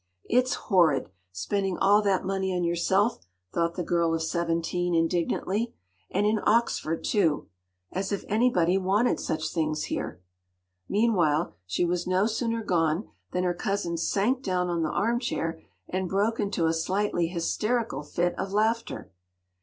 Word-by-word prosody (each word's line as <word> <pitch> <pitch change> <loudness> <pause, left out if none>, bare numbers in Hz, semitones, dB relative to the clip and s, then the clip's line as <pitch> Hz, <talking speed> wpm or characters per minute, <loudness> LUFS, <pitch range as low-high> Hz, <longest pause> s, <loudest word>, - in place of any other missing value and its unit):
“It’s 250 +1 +2
horrid!—spending 155 - 0
all 205 +2 +5
that 195 -3 +1
money 190 -1 -1
on 180 - 0
yourself,” 190 +6 +2 0.3
thought 170 0 0
the 180 - -2
girl 170 -1 +1
of 160 - -2
seventeen 170 +1 0
indignantly. 180 +6 0 0.3
“And 200 +2 +1
in 215 +1 +2
Oxford 210 -8 +1
too!—as 120 - -2
if 200 - -2
anybody 195 -5 +3
wanted 200 +6 +2
such 155 0 -2
things 155 -2 0
here.” - - -4 0.7
Meanwhile, 180 -8 +2
she 100 - +1
was 175 0 -1
no 185 +2 +3
sooner 230 0 -1
gone 165 0 +1 0.2
than 180 - 0
her 180 -1 +1
cousin 195 -2 -2
sank 205 +9 +1
down 180 -5 0
on 170 -1 0
the 160 - 0
armchair, 225 -7 -1 0.3
and 185 0 -2
broke 210 +5 +1
into 200 -5 0
a 160 - +2
slightly 180 +1 0
hysterical 215 +6 -1
fit 175 +4 -1
of 190 0 -3
laughter. 220 - 0
180 Hz, 140 wpm, -27 LUFS, 165-205 Hz, 0.7 s, all